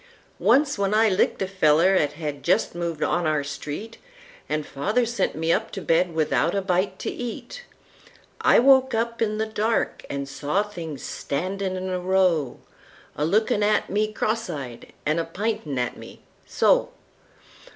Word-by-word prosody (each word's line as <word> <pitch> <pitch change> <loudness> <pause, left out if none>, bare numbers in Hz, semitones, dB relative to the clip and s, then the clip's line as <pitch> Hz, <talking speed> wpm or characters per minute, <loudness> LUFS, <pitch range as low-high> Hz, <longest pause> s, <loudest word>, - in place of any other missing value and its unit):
Once, 280 -4 +3
when 200 +1 +1
I 220 0 +5
licked 190 0 +1
a - - -2
feller 180 -1 +4
'at 150 -6 +2
had 150 -2 -5
just 185 +5 +1
moved 170 -2 -3
on 175 -2 +1
our 155 -2 +1
street, 150 +10 -6 0.5
An' 155 0 -1
father 210 - 0
sent 235 +1 -1
me 160 +2 +1
up - - -1
to 195 - -4
bed 165 +2 +2
without 160 +3 +1
a 200 - +1
bite 185 +1 0
to - - -4
eat,I 250 - -3
woke 265 0 +5
up 230 +1 -2
in 215 -1 +1
the 220 - 0
dark 220 +1 -1
an 140 0 -3
saw 145 +8 -1
things 165 -9 -7
standin' 185 +6 -3
in 185 0 -4
a 185 -1 -2
row,A 180 -6 -2
lookin' 210 +4 +2
at 210 +1 +1
me 215 +2 +1
cross 220 0 -1
eyed 135 -7 -7
an' 155 +3 +1
p'intin' 185 - -3
at 125 -1 -2
me—so! - - -1
185 Hz, 155 wpm, -24 LUFS, 155-215 Hz, 0.5 s, I